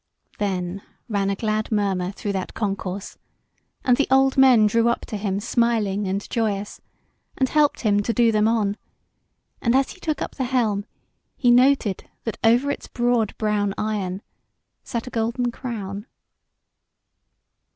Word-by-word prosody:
Then 190 -2 -2 0.3
ran 200 -2 0
a 200 - 0
glad 215 +1 -2
murmur 195 -4 0
through 205 +1 -4
that 190 -2 -4
concourse, 195 -2 -4 0.7
and 250 -2 +4
the 285 - +2
old 270 0 +4
men 255 -5 +6
drew 230 +2 +3
up 235 - 0
to - - -7
him 200 -1 -2
smiling 215 -3 0
and 195 +2 -2
joyous, 210 -3 -2 0.6
and 260 - +2
helped 300 +1 +2
him 205 -3 +2
to 220 - -1
do 235 -1 +3
them 215 0 +3
on; 215 -3 +1 0.8
and 235 +1 +2
as 270 0 +2
he - - -13
took 310 -4 -2
up - - -4
the 260 - -2
helm, 225 -6 0 0.5
he 245 -3 +4
noted 250 -5 +3
that 225 - -4
over 240 +5 +4
its - - -6
broad 240 -3 0
brown 205 -2 0
iron 200 -3 -2 0.6
sat 235 -1 -4
a 250 - -8
golden 235 +2 -1
crown. 210 -4 -6
215 Hz, 150 wpm, -23 LUFS, 200-245 Hz, 0.8 s, men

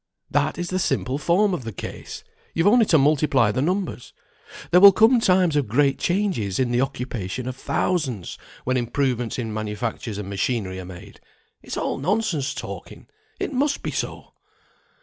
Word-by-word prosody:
That - - +1
is 175 -1 -3
the 185 - 0
simple 135 -4 -1
form 190 +5 +2
of 155 - -3
the 115 - -5
case; 95 - -8 0.3
you've 165 - +1
only 225 +1 +5
to 160 - +5
multiply 140 -5 +3
the 130 - -1
numbers. 180 -4 -2 0.6
There 180 - +6
will 200 0 +11
come 225 +5 +5
times 185 -6 +3
of 145 -5 +1
great 135 +5 +2
changes 175 - 0
in 125 -2 +1
the 120 +1 +2
occupation 125 -3 -4
of 130 - -4
thousands, 130 - -2 0.3
when 130 +1 0
improvements 125 -1 -1
in 115 -4 -3
manufactures 110 0 -4
and 105 -2 -5
machinery 100 -1 -2
are 90 - -7
made. 95 +2 -12 0.4
It's - - -6
all - - -2
nonsense 170 -3 0
talking, - - -8 0.3
it - - -3
must 280 +2 0
be - - -2
so!" - - -5
135 Hz, 170 wpm, -23 LUFS, 115-180 Hz, 0.6 s, will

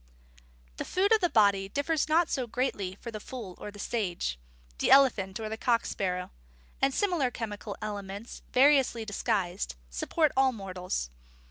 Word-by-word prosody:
The - - -2
food 390 +4 +1
of 440 -1 +5
the 350 - +3
body 200 -6 +3
differs 295 +6 0
not 330 +2 +4
so 255 -3 -2
greatly 210 -6 -2
for 235 - -7
the 215 - -6
fool 220 -4 -7
or - - -6
the 205 - -12
sage, 180 - -2 0.4
the - - +1
elephant 220 -9 +5
or 220 - -3
the 220 +1 -4
cock 235 0 +2
sparrow; 180 -2 -2 0.5
and 270 - +4
similar 345 -6 +1
chemical 210 -3 -6
elements, 205 +1 -6
variously 265 -4 +4
disguised, 195 - -1 0.2
support 300 - +1
all 265 -1 +4
mortals. 185 - -4
220 Hz, 155 wpm, -29 LUFS, 195-270 Hz, 0.5 s, of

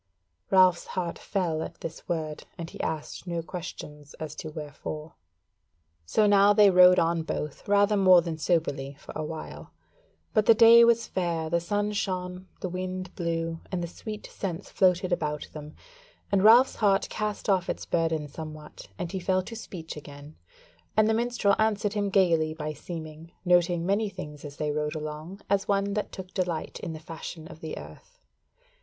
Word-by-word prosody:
Ralph's 185 -2 +5
heart 175 -2 -2
fell 175 -5 -1
at - - -7
this 165 0 -8
word, 155 -3 -3
and 165 -2 -6
he - - -6
asked 160 +3 -4
no 170 -1 -2
question 160 -4 -7 0.2
as 155 -2 -5
to 155 - -7
wherefore. 150 0 -7 0.9
So 215 - +3
now 205 0 +6
they 205 -1 +6
rode 180 0 +8
on 165 0 +2
both, 150 -2 -5
rather 205 +1 +4
more 185 -3 +7
than 165 -2 -4
soberly 145 -5 0
for - - -11
a 155 - -2
while: 155 +1 -7 0.6
but 215 -2 +2
the 230 - +8
day 230 +1 +9
was 235 0 +4
fair; 165 -3 -2
the 170 - +3
sun 205 +4 -1
shone, 185 -2 -3
the - - -2
wind 185 0 -5
blew, 165 -2 -2
and 180 -2 -2
the - - -2
sweet 215 +5 -8
scents 175 -4 -5
floated 185 -1 +2
about 150 -4 -2
them, 150 0 -9 0.6
and 195 -1 +3
Ralph's 235 +5 +7
heart 200 -2 +3
cast 210 -1 -3
off 190 -3 +2
its - - -3
burden 160 -3 0
somewhat 155 -4 -9
and 170 - -4
he 190 - -3
fell 185 +1 +1
to 230 - -8
speech 175 -7 -7
again; 145 0 -11 0.6
and 215 0 +5
the 220 - +3
minstrel 230 -3 +2
answered 210 -1 +1
him 205 -1 0
gaily 165 -5 +3
by 155 -1 -4
seeming, 160 +1 -8
noting 175 -1 +3
many 200 +3 +1
things 150 -6 -9
as 145 -1 -9
they 150 -1 -1
rode 150 +1 -2
along, 155 +5 -6
as 200 0 +1
one 200 0 +1
that 210 0 -2
took 190 -1 -9
delight 175 -4 -2
in 165 - -5
the 155 - -7
fashion 160 0 -8
of 160 - -12
the 160 -1 -6
earth. - - -12
175 Hz, 175 wpm, -27 LUFS, 160-200 Hz, 0.9 s, day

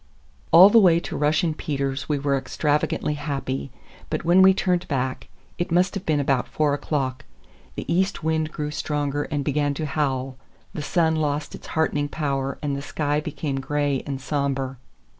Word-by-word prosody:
All 185 +4 +9
the 230 - +7
way 175 -5 +5
to - - -6
Russian 155 +2 +1
Peter's 140 -3 -3
we 150 - +1
were 140 0 0
extravagantly 150 +2 0
happy, 135 - -3 0.4
but - - -3
when 175 +3 +6
we 190 0 +8
turned 185 -2 0
back,—it 135 +6 -4
must 180 +2 +3
have 195 -1 -6
been 155 -2 +2
about 135 -3 +1
four 150 -2 +1
o'clock,—the 130 - -5
east 190 0 0
wind 160 -1 0
grew 150 -1 -4
stronger 145 -1 -2
and 145 -2 -3
began 145 0 0
to 155 - -3
howl; 135 -3 -2 0.4
the - - -4
sun 160 +1 +1
lost 150 -1 -1
its - - -10
heartening 145 -2 +1
power 140 -3 -2
and 145 -1 -1
the 140 - -4
sky 145 0 -1
became 150 -2 -3
gray 145 -1 -1
and 135 -2 -3
somber. 135 -2 -2
145 Hz, 165 wpm, -24 LUFS, 140-160 Hz, 0.4 s, All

